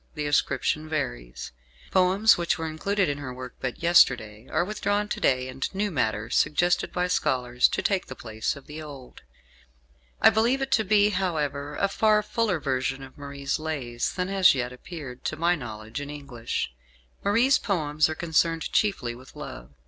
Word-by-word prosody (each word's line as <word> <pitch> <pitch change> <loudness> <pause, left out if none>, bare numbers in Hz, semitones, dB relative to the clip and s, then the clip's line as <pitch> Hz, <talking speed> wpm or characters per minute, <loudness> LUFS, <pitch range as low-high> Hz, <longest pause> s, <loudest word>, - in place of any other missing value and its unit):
The 150 -1 -3
ascription 145 +1 0
varies. - - -4 0.4
Poems 190 +4 +5
which 170 0 0
were 165 - -3
included 185 +5 0
in 145 0 -2
her 135 -3 -6
work 125 0 -8
but 130 +4 -4
yesterday 125 -9 +4
are 175 +3 +1
withdrawn 205 0 -1
to - - -3
day, 130 -1 +2
and 130 +1 -3
new 205 +1 0
matter 110 -7 -1
suggested 175 +4 +2
by 180 0 0
scholars 125 -8 +2
to - - -2
take 195 -2 0
the 130 - -7
place 110 -2 -3
of 140 - -12
the 150 +1 -8
old. 140 -4 -11 1.0
I - - +7
believe 230 +5 +2
it 270 0 -3
to 220 - +4
be, 205 +1 +4
however, 150 -7 -2
a 200 - +1
far 210 +1 +3
fuller 215 -8 0
version 135 -1 -1
of 130 - -12
Marie's 140 0 -4
"Lays" 135 -7 -3
than 180 -1 -2
has 190 -5 +5
yet 125 -1 -2
appeared, 135 -2 -9
to - - -1
my 170 +2 +3
knowledge, 110 -3 -6
in 145 - -6
English. 130 - -4 0.5
Marie's 235 +7 +4
poems 155 -6 +1
are 155 - -3
concerned 165 0 0
chiefly 195 - +1
with 130 +2 -14
love. - - -8
150 Hz, 175 wpm, -26 LUFS, 130-185 Hz, 1.0 s, I